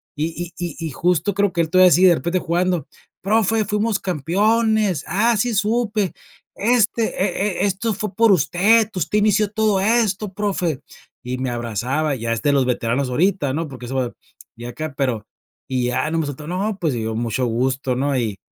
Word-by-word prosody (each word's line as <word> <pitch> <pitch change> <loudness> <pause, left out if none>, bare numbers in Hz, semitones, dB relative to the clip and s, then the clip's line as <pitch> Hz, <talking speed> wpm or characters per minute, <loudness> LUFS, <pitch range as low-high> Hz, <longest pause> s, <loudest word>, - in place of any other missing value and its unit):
Y 165 +3 -4
y 175 -4 -4
y 165 -2 -4
justo 175 +6 0
creo 200 0 +1
que 170 - +1
él 160 - -1
todavía 185 0 +7
sigue, 180 +4 +6
de 175 - +5
repente 170 +3 -1
jugando: 175 -2 0 0.4
"Profe, 220 +2 +2
fuimos 210 0 0
campeones". 200 +3 +1
"Ah, 220 +7 +2
sí 235 +3 0
supe". 210 -1 0 0.4
"Este 230 0 +2 0.2
e 195 0 -1
e - - +3
esto 205 +3 -1
fue 210 0 -4
por 230 -1 +5
usted, 200 - +3
usted 180 +3 -1
inició 210 0 +2
todo 215 -2 +1
esto, 210 -2 +1
profe". 185 -7 -2 0.4
Y 125 +1 -4
me 130 0 -2
abrazaba, 120 +6 -2
ya 115 -2 -2
es 115 - -4
de 145 - +3
los 135 -2 +3
veteranos 125 +2 0
ahorita, 160 +1 +1
¿no? 160 +2 -2
Porque 125 -3 -9
eso 135 - -5
va 125 -2 -1 0.4
de 120 +1 -7
acá, 155 +4 -6
pero 125 -7 -1 0.4
y 130 -2 -1
ya 125 +5 -1
no, 165 - 0
me 155 - -1
soltó 145 +1 -7
¿no? 195 +4 -2
Pues, 160 -5 0
dio 110 -2 -3
mucho 115 +2 -1
gusto, 130 +2 -1
¿no? 140 +2 0
Y 110 -5 -2
175 Hz, 190 wpm, -21 LUFS, 135-205 Hz, 0.4 s, todavía